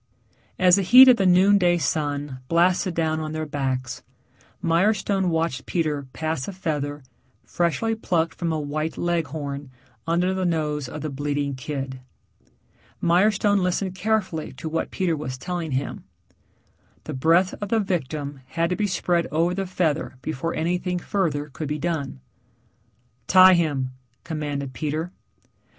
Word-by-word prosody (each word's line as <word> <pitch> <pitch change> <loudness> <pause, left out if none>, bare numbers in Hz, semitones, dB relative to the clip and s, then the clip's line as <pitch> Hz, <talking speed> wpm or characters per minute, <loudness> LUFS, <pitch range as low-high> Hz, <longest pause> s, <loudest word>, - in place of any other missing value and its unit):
As 180 0 +5
the - - +2
heat 255 +7 +9
of 250 - +6
the 195 - +2
noon 190 +3 +5
day 175 -1 +3
sun 145 -4 -2
blasted 175 +2 +2
down 160 -1 0
on 155 0 -4
their 155 0 -3
backs, 130 -4 -3 0.6
Mirestone 190 +2 +1
watched 160 -5 -1
Peter 150 -5 -1
pass 155 -3 -3
a - - -3
feather, 145 -5 -3 0.4
freshly 175 +6 0
plucked 170 -7 0
from 170 -1 -2
a 160 - -1
white 155 +2 -3
Leghorn, 145 -5 -2 0.4
under 175 +3 +1
the 190 0 -2
nose 150 -5 -1
of 150 - -7
the 155 - -4
bleating 145 0 -2
kid. 135 0 -5 1.0
Mirestone 200 +4 +3
listened 180 +1 -1
carefully 190 -4 -1
to 135 +5 -7
what 165 +1 -2
Peter 180 -3 0
was 130 -4 -5
telling 170 0 -4
him. 130 +1 -3 1.0
The - - -6
breath 165 +7 +3
of 205 - -3
the 225 - +2
victim 145 -7 -3
had 165 +4 -1
to - - +1
be 210 +1 0
spread 175 -2 0
over 165 +3 +1
the 195 +1 -3
feather 160 -6 -1
before 160 +3 -3
anything 180 +2 -1
further 160 -6 -1
could 150 +3 -6
be 150 +1 -2
done. 150 - -3 1.1
"Tie 185 0 +8
him," 145 -7 0 0.3
commanded 145 -4 -4
Peter. 155 +4 -3
165 Hz, 145 wpm, -24 LUFS, 145-180 Hz, 1.1 s, heat